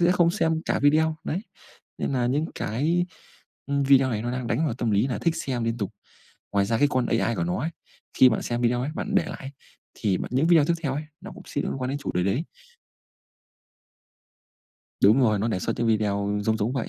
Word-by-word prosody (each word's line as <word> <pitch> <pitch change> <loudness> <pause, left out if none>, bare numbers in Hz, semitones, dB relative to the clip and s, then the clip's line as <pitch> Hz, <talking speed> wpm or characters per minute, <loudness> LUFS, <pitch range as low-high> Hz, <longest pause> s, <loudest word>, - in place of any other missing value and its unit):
sẽ 175 +1 +4
không 175 -2 +3
xem 160 -4 0
cả - - 0
video, 155 +2 +3
đấy. 175 - -2 0.6
Nên - - -2
là 125 -2 +1
những 140 +5 +1
cái 155 - 0 0.6
video 140 -2 +4
này 110 -2 -2
nó 120 - -2
đang 125 -1 -3
đánh 150 +7 0
vào 125 - -1
tâm 120 -2 -1
lý 105 +4 +2
là 125 - -2
thích 165 -1 0
xem 125 -7 -2
liên 115 +1 -1
tục. 100 -3 -2 0.6
Ngoài 100 -1 +3
ra 115 +2 0
cái 145 - +5
con 130 -3 +1
AI 115 - +1
của - - 0
nó 180 +2 -1
ấy, 160 - -2 0.4
khi 130 - +7
bạn 110 - -1
xem 120 0 -2
video 120 0 +2
ấy, 135 +4 -2
bạn 205 +4 -3
để 195 - +4
lại - - -5
ấy, 135 - -7 0.4
thì 100 -5 0
bật - - -4
những 135 +5 +2
video 165 -3 +6
tiếp 170 +3 +1
theo 135 -4 -1
ấy, 150 +2 -3 0.2
nó 195 - -9
cũng - - -11
sẽ 145 - -2
liên - - -2
quan 125 - -2
đến 140 - -2
chủ 145 - -4
đề 90 - +1
đấy. 115 - 0 2.6
Đúng 110 +7 +6
rồi, 110 -4 +3
nó 110 +4 0
để 100 - -1
xuất - - -1
những 120 - +1
video 105 -2 +1
giống 110 +1 +2
giống 110 +3 -1
vậy. 130 -4 -2
130 Hz, 235 wpm, -25 LUFS, 115-155 Hz, 2.6 s, khi